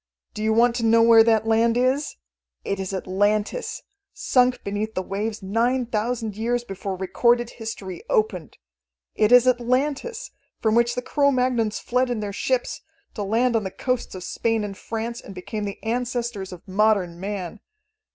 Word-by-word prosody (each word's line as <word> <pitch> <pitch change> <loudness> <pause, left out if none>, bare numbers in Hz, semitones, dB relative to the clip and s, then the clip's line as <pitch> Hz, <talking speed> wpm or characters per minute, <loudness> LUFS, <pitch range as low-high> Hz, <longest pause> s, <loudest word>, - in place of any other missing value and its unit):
Do 215 - -6
you 220 0 +1
want 235 +2 +4
to 235 - -2
know 230 0 +5
where 230 -1 +8
that 225 -1 +3
land 230 +1 +3
is? 260 +4 +1 0.5
It 200 - -2
is 190 0 -3
Atlantis, 205 - -1 0.3
sunk 250 -1 +2
beneath 210 +2 -3
the 185 - -1
waves 210 +2 -4
nine 240 +6 +1
thousand 225 -1 -2
years 235 +3 -1
before 195 -3 -5
recorded 235 +5 +1
history 205 -6 -7
opened. 190 -6 0 0.6
It 215 +1 +2
is 245 0 +7
Atlantis, 280 - 0 0.3
from 220 -1 +1
which 235 +1 +3
the 250 - -3
Cro 280 +2 +2
Magnons 250 -5 +1
fled 250 +1 0
in 240 -3 -1
their 205 -1 -4
ships, 255 +4 -1 0.3
to 210 - -5
land 230 +4 +1
on 220 - +1
the 190 - -3
coasts 250 +1 -3
of 185 - -7
Spain 225 +3 -1
and 200 -1 -5
France, 230 +4 -5
and 195 - -11
become 205 +3 -5
the 200 -1 -5
ancestors 235 -4 -2
of 180 -2 -11
modern 190 -3 +1
man. 195 0 -5
225 Hz, 170 wpm, -23 LUFS, 205-245 Hz, 0.6 s, where